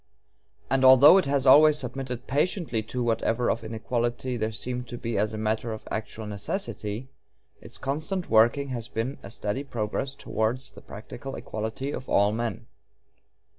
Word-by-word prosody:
And 135 0 +1
although 130 +8 +9
it 185 - -1
has 140 -1 +1
always 150 +3 +7
submitted 125 -1 -5
patiently 150 - 0
to 125 0 -2
whatever 115 +1 +1
of - - -3
inequality 120 +3 -2
there 110 -1 -1
seemed 125 +3 -5
to 120 - -6
be 115 -1 -3
as 105 +2 0
matter 110 +1 -1
of 110 - -9
actual 110 0 -4
necessity, 105 - -4 0.5
its - - -10
constant 155 +7 -3
working 115 +5 +4
has 120 -3 -4
been 125 +6 -3
a 100 - -9
steady 105 +5 -3
progress 120 +1 -3
towards 125 +3 -2
the - - -14
practical 120 +6 -8
equality 110 +6 -4
of 130 - -6
all 100 +1 +4
men. 115 +1 -3
120 Hz, 155 wpm, -27 LUFS, 110-135 Hz, 0.5 s, although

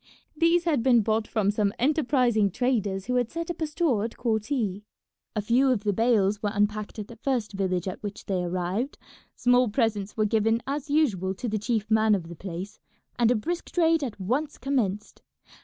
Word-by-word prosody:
These 335 +2 +3
had 310 -7 +1
been 240 -1 +5
bought 215 +1 0
from 205 -3 +1
some 205 -1 0
enterprising 250 -6 +2
traders 205 -4 -1
who 250 0 0
had 245 -2 +1
set 335 +1 -4
up 340 - -9
a 315 - +1
store 300 - +1
at 230 - -5
Korti. 220 -3 -1 0.5
A 210 - -1
few 250 +5 +3
of 235 -5 +1
the 205 -1 +1
bales 210 -2 +2
were 210 - 0
unpacked 210 +1 -1
at 210 -2 -5
the 235 - -12
first 240 -3 -1
village 185 -2 -1
at 185 - -5
which 205 -1 -7
they 185 -2 -1
arrived; 185 +9 -2 0.4
small 245 -1 +3
presents 210 -3 -1
were 215 - +2
given 225 +2 +2
as 285 +2 -4
usual 205 - +1
to 240 - -4
the 215 -1 -1
chief 220 0 -2
man 220 -1 +4
of 170 -4 -5
the 170 - -8
place, 190 +4 -7 0.4
and 235 -1 +4
a 245 - +4
brisk 340 +11 -3
trade 330 -3 +3
at 235 -6 -5
once 260 +11 -1
commenced. 225 -7 -2
220 Hz, 195 wpm, -26 LUFS, 205-255 Hz, 0.5 s, been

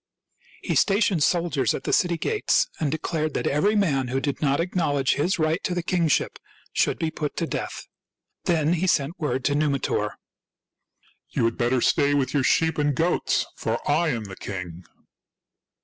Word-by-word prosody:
He - - -1
stationed 195 -4 +2
soldiers 155 -7 +1
at - - -6
the - - -1
city 175 -2 +2
gates, 430 - +1
and 150 -3 0
declared 155 -1 -2
that - - -1
eveiy 200 +10 +2
man 140 -10 +1
who 130 +2 -1
did 140 0 -3
not 140 -2 +2
acknowledge 160 -6 +1
his 175 +7 0
right 160 +2 0
to 180 - -1
the 175 - -2
kingship 170 -4 +1 0.3
should - - +1
be 160 -1 -2
put 150 -1 -4
to 165 - -1
death. - - -5 0.6
Then 165 -3 +2
he 180 +2 0
sent 160 +1 0
word 130 -4 -2
to 145 - +2
Numitor: 145 -2 0 0.4
— - - -62
" - - -37
You - - +2
had 115 - 0
better 120 +1 +1
stay 145 +2 +3
with 130 -2 0
your 145 -3 +2
sheep 160 +4 +2
and 145 -1 +1
goats, 170 +5 +1
for - - -2
I 170 - +2
am 115 -6 -2
the 95 -2 -8
king 90 -3 -7
150 Hz, 180 wpm, -24 LUFS, 135-170 Hz, 0.6 s, stay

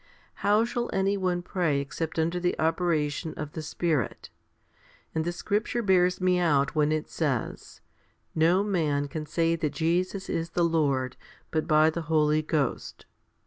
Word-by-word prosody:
How 210 +2 +4
shall 240 0 -3
any 195 +1 +1
one 180 -2 -1
pray 170 -6 0
except 160 +4 -4
under 165 +2 0
the 175 0 0
operation 160 -1 0
of 150 -1 -5
the 160 - -5
Spirit? 155 - -2 0.8
And 160 - 0
the 175 - 0
scripture 215 +6 -1
bears 180 -2 +3
me 180 -1 +2
out 145 -5 +2
when 150 -1 +2
it 155 0 -1
says, 140 -8 -3 0.5
No 170 +5 +3
man 155 -8 0
can 155 0 -6
say 165 +2 +1
that 155 -3 -2
Jesus 180 +4 -1
is 165 0 -2
the 175 - +4
Lord, 140 -6 0 0.3
but 155 -1 -1
by 155 +1 +5
the 170 - -4
Holy 155 -1 +3
Ghost. 150 -4 -2
165 Hz, 155 wpm, -27 LUFS, 155-180 Hz, 0.8 s, by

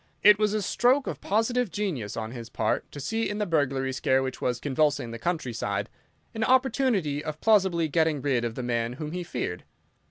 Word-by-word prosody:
It 210 0 +8
was 215 0 +2
a 210 - 0
stroke 255 +8 +2
of - - -5
positive 225 +3 +1
genius 160 - -3
on 110 0 -4
his 120 -2 -8
part 110 -1 -1
to 145 - -8
see 225 +11 -1
in 205 - -3
the 210 - 0
burglary 135 -6 0
scare 130 +1 +2
which 130 -1 -5
was 125 -1 0
convulsing 145 -3 0
the 115 - -7
country 160 -5 -2
side 100 -2 -2 0.4
an 225 - -2
opportunity 245 - +2
of 155 -1 -5
plausibly 190 -7 +3
getting 160 -1 +1
rid 130 -3 0
of 115 -1 -3
the 130 - -4
man 120 -1 -1
whom 150 +3 -6
he 180 +1 -3
feared. 120 - -4
150 Hz, 200 wpm, -27 LUFS, 125-205 Hz, 0.4 s, It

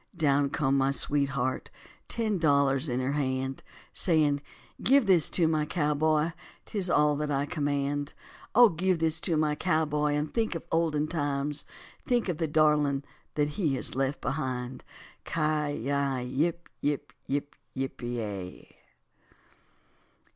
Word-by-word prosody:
Down 140 -3 +3
come 135 -1 +1
my 135 0 +3
sweetheart, 140 -2 0 0.4
ten 215 -4 -1
dollars 140 -2 +3
in 125 +1 0
her 130 +2 0
hand, 135 -2 -1 0.3
Saying, 150 -5 +2 0.4
"Give 270 -1 +4
this 180 -6 +4
to 170 -3 +2
my 155 -1 +1
cowboy, 155 0 +1 0.3
'tis 195 -4 -1
all 150 -3 +4
that 150 0 -2
I 140 0 +1
command; 145 -2 -2 0.4
O 240 0 +8
give 185 +1 +1
this 160 0 0
to 165 -1 0
my 155 -1 +2
cowboy 150 -2 +1
and 150 +1 -2
think 225 -6 0
of 165 - -5
olden 155 -2 +1
times, 145 -2 -2 0.4
Think 240 -5 +1
of 170 -3 -2
the 165 - +1
darling 150 -2 +3 0.3
that 150 -1 +1
he 150 -3 0
has - - -2
left 135 +2 -1
behind." 130 -1 -3 0.5
Ci 150 -2 0
yi 140 -1 0
yip 160 +7 -1
yip 145 -1 -2
yip 145 +1 -2 0.4
pe 105 -7 -4
ya. - - -18
150 Hz, 140 wpm, -28 LUFS, 140-160 Hz, 0.5 s, O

